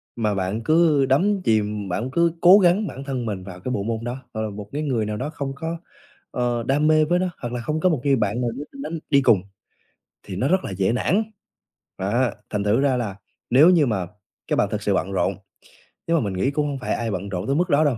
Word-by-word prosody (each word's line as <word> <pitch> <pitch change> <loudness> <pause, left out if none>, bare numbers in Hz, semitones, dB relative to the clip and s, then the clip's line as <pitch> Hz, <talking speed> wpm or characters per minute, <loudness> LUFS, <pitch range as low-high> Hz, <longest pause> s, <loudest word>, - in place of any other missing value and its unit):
mà 110 -3 0
bạn 95 +3 -2
cứ 155 -1 +4
đắm 185 +10 +2
chìm, 105 - 0
bạn 115 +8 -2
cứ 170 +3 +2
cố 185 +4 +8
gắng 190 +3 +3
bản 135 - -7
thân 130 -3 -3
mình 100 -4 -4
vào 90 -2 -9
cái 125 - -4
bộ 100 - -1
môn 115 +1 -3
đó, 120 +1 -3 0.2
hoặc 110 - -3
là 110 - -2
một 100 0 -8
cái 145 - -3
người 125 -7 0
nào 105 0 -3
đó 130 +6 -3
không 140 -3 -4
có, 165 +3 -4 0.5
ờ, 120 -1 -1
đam 145 +5 +1
mê 155 0 +4
với 175 +3 +1
nó, 185 0 0
hoặc 120 -1 -4
là 120 - -3
không 150 +6 -2
có 185 - +3
một 155 -7 0
người 140 -1 +3
bạn 110 0 -1
nào 120 - 0
đó 135 +5 -6
đánh 220 - -6
đi 140 -2 +5
cùng 110 -7 +4 0.8
thì 95 - -7
nó 120 +8 0
rất 185 +4 +2
là - - -5
dễ 95 +2 +1
nản. 180 - +1 0.7
Đó, 115 +6 +1 0.2
thành 105 -1 -2
thử 105 +5 +2
ra 135 -3 +2
là 110 -6 -3 0.3
nếu 140 +8 +7
như 170 -5 +5
mà 100 -8 -1 0.4
các - - +1
bạn - - +2
thật - - -2
sự - - +1
bận - - -1
rộn, - - 0 0.7
nhưng 165 0 +3
mà 155 - 0
mình 100 -3 -2
nghĩ 95 +9 0
cũng 150 +1 0
hông 140 -2 -4
phải 125 - -2
ai 115 -2 -2
bận 95 +1 -4
rộn 95 +1 -4
tới 135 - +1
mức 175 +4 +1
đó 150 0 +4
đâu, 135 -5 +1
125 Hz, 255 wpm, -23 LUFS, 105-155 Hz, 0.8 s, cố